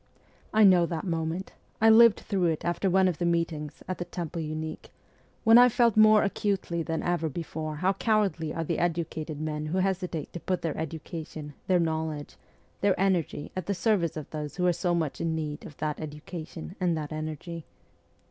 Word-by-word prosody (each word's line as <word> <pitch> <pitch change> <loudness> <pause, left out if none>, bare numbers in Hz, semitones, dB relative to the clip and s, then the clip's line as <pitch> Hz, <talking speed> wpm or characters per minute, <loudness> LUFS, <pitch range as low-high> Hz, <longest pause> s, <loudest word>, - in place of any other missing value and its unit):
I 220 0 +5
know 180 -4 +6
that 165 -2 -3
moment; 165 +1 -3 0.3
I 225 0 +6
lived 230 -1 +7
through 190 -3 0
it 160 -2 -1
after 175 +3 0
one 190 +1 +4
of 175 -4 -1
the - - -1
meetings 165 -3 -2
at 185 - -4
the 175 - -3
Temple 170 -2 -5
Unique, 155 0 -5 0.5
when 225 +1 +8
I 250 0 +8
felt 235 -2 +3
more 215 0 +7
acutely 195 -4 -1
than 160 0 -2
ever 175 -2 0
before 155 0 -5
how 185 +5 +1
cowardly 195 -7 +1
are 165 - -2
the 165 +1 -2
educated 160 -3 -2
men 155 -1 -3
who 170 +5 -1
hesitate 185 -4 -1
to 175 - -5
put 185 +2 -2
their 160 -3 -1
education, 160 -1 -6
their 185 -1 +4
knowledge, 160 -2 -2 0.4
their 200 -2 +2
energy 185 -6 0
at 185 - -4
the 200 - 0
service 185 -6 +1
of 155 - -6
those 150 -2 -5
who 180 - 0
are 180 - +4
so 175 +1 0
much 160 -4 -2
in 165 -1 0
need 150 -2 -4
of 150 - -14
that 155 0 -2
education 160 +3 -7
and 175 -3 +1
that 150 -1 -5
energy. 155 +2 -5
170 Hz, 190 wpm, -28 LUFS, 155-185 Hz, 0.5 s, when